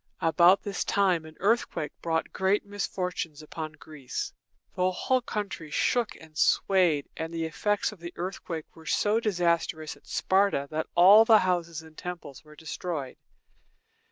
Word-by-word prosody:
About 170 Hz, +4 st, +5 dB
this 200 Hz, -1 st, -2 dB
time 185 Hz, -5 st, +1 dB
an 155 Hz, 0 st, -12 dB
earthquake 195 Hz, -7 st, 0 dB
brought 160 Hz, -1 st, -1 dB
great 190 Hz, +2 st, +1 dB
misfortunes 180 Hz, -6 st, -4 dB
upon 155 Hz, 0 st, -6 dB
Greece. 150 Hz, -4 st, -6 dB, 0.4 s
The 180 Hz, 0 st, +1 dB
whole 255 Hz, +8 st, 0 dB
country 205 Hz, -9 st, -5 dB
shook 235 Hz, +8 st, +1 dB
and 160 Hz, -1 st, -16 dB
swayed, 175 Hz, -4 st, +3 dB
and 160 Hz, 0 st, -4 dB
the 165 Hz, -1 st, -2 dB
effects 205 Hz, +7 st, 0 dB
of 210 Hz, -, -13 dB
the 170 Hz, +1 st, -7 dB
earthquake 175 Hz, -3 st, -6 dB
were 160 Hz, -1 st, -14 dB
so 215 Hz, +2 st, +2 dB
disastrous 170 Hz, -6 st, 0 dB
at -, -, -23 dB
Sparta 190 Hz, -7 st, +1 dB
that 155 Hz, +1 st, -2 dB
all 195 Hz, +5 st, +8 dB
the 225 Hz, -1 st, +7 dB
houses 170 Hz, -4 st, -1 dB
and 160 Hz, -1 st, -16 dB
temples 170 Hz, -7 st, -8 dB
were 150 Hz, 0 st, -16 dB
destroyed. 160 Hz, -3 st, -5 dB
170 Hz, 150 wpm, -28 LUFS, 160-195 Hz, 0.4 s, all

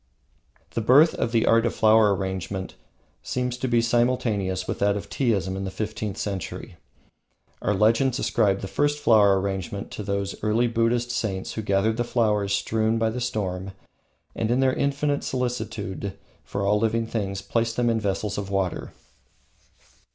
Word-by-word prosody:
The 115 Hz, -, -2 dB
birth 140 Hz, +8 st, +6 dB
of 115 Hz, -, -2 dB
the 115 Hz, -1 st, +2 dB
Art 115 Hz, 0 st, +4 dB
of 120 Hz, -, -1 dB
Flower 110 Hz, -2 st, +5 dB
Arrangement 95 Hz, 0 st, -4 dB, 0.5 s
seems 125 Hz, -1 st, -2 dB
to 130 Hz, -, -2 dB
be 120 Hz, -1 st, +2 dB
simultaneous 115 Hz, -6 st, 0 dB
with -, -, -3 dB
that 100 Hz, 0 st, +2 dB
of 100 Hz, -, -8 dB
Teaism 100 Hz, -8 st, 0 dB
in 95 Hz, -, -4 dB
the 95 Hz, -, -3 dB
fifteenth 105 Hz, 0 st, -4 dB
century. 100 Hz, -4 st, -5 dB, 0.8 s
Our 105 Hz, -, +1 dB
legends 115 Hz, +5 st, +3 dB
ascribe 100 Hz, -6 st, +1 dB
the 95 Hz, -, -4 dB
first 145 Hz, +7 st, 0 dB
flower 105 Hz, -8 st, +5 dB
arrangement 95 Hz, 0 st, -4 dB
to -, -, -6 dB
those 100 Hz, -1 st, -2 dB
early 110 Hz, +3 st, +2 dB
Buddhist 120 Hz, +1 st, +1 dB
saints 95 Hz, -6 st, -3 dB
who 110 Hz, -, -3 dB
gathered 105 Hz, +2 st, +1 dB
the 120 Hz, -, +1 dB
flowers 105 Hz, -4 st, +1 dB
strewn 110 Hz, +3 st, +1 dB
by 115 Hz, -1 st, +1 dB
the 125 Hz, +2 st, -4 dB
storm 95 Hz, -5 st, -3 dB, 0.6 s
and, 110 Hz, -, -1 dB
in 120 Hz, +2 st, +2 dB
their 130 Hz, -1 st, +3 dB
infinite 140 Hz, +1 st, 0 dB
solicitude 115 Hz, -6 st, -3 dB, 0.3 s
for 100 Hz, 0 st, -3 dB
all 105 Hz, +1 st, +3 dB
living 115 Hz, +1 st, +1 dB
things, 100 Hz, -4 st, -3 dB
placed 115 Hz, +2 st, -1 dB
them 120 Hz, -1 st, +1 dB
in 115 Hz, -1 st, +2 dB
vessels 100 Hz, 0 st, -2 dB
of 100 Hz, -1 st, -5 dB
water. 95 Hz, -2 st, -2 dB
110 Hz, 165 wpm, -25 LUFS, 100-120 Hz, 0.8 s, birth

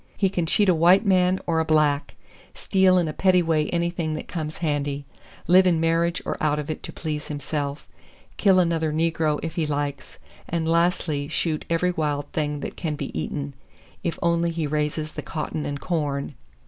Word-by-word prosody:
He 195 Hz, -, +2 dB
can 175 Hz, -3 st, -1 dB
cheat 205 Hz, +4 st, +3 dB
a 185 Hz, -, +6 dB
white 175 Hz, +6 st, +5 dB
man 185 Hz, -1 st, +3 dB
or 165 Hz, -1 st, +1 dB
a -, -, +2 dB
black, 150 Hz, -2 st, +1 dB, 0.4 s
steal 190 Hz, -2 st, +3 dB
in 175 Hz, -2 st, +2 dB
a 155 Hz, -, -3 dB
petty 180 Hz, 0 st, +3 dB
way 160 Hz, -2 st, +1 dB
anything 170 Hz, -2 st, -1 dB
that 155 Hz, -, -6 dB
comes 155 Hz, -3 st, -4 dB
handy, 145 Hz, -3 st, -2 dB, 0.4 s
live 185 Hz, +2 st, +6 dB
in 170 Hz, -3 st, +3 dB
marriage 165 Hz, +1 st, +1 dB
or -, -, -3 dB
out 150 Hz, -1 st, +2 dB
of 150 Hz, +1 st, -3 dB
it -, -, -6 dB
to -, -, -7 dB
please 150 Hz, -2 st, -4 dB
himself, 145 Hz, 0 st, -4 dB, 0.5 s
kill 190 Hz, -2 st, +4 dB
another 165 Hz, -3 st, +1 dB
negro 160 Hz, -1 st, +1 dB
if 165 Hz, -1 st, -3 dB
he 160 Hz, -3 st, -1 dB
likes, 145 Hz, -1 st, -3 dB, 0.3 s
and 165 Hz, -1 st, -1 dB
lastly 165 Hz, -3 st, +1 dB
shoot 155 Hz, 0 st, -2 dB
every 170 Hz, +2 st, +2 dB
wild 150 Hz, -4 st, -1 dB
thing 150 Hz, -2 st, -2 dB
that -, -, -5 dB
can 160 Hz, -4 st, -3 dB
be 145 Hz, -2 st, -6 dB
eaten, 140 Hz, -1 st, -3 dB, 0.5 s
if 170 Hz, -, -2 dB
only 170 Hz, 0 st, +2 dB
he 165 Hz, -1 st, -2 dB
raises 150 Hz, +1 st, -1 dB
the -, -, -6 dB
cotton 155 Hz, -1 st, -4 dB
and 145 Hz, -, -3 dB
the -, -, -16 dB
corn. 145 Hz, -5 st, -2 dB
160 Hz, 190 wpm, -24 LUFS, 150-170 Hz, 0.5 s, a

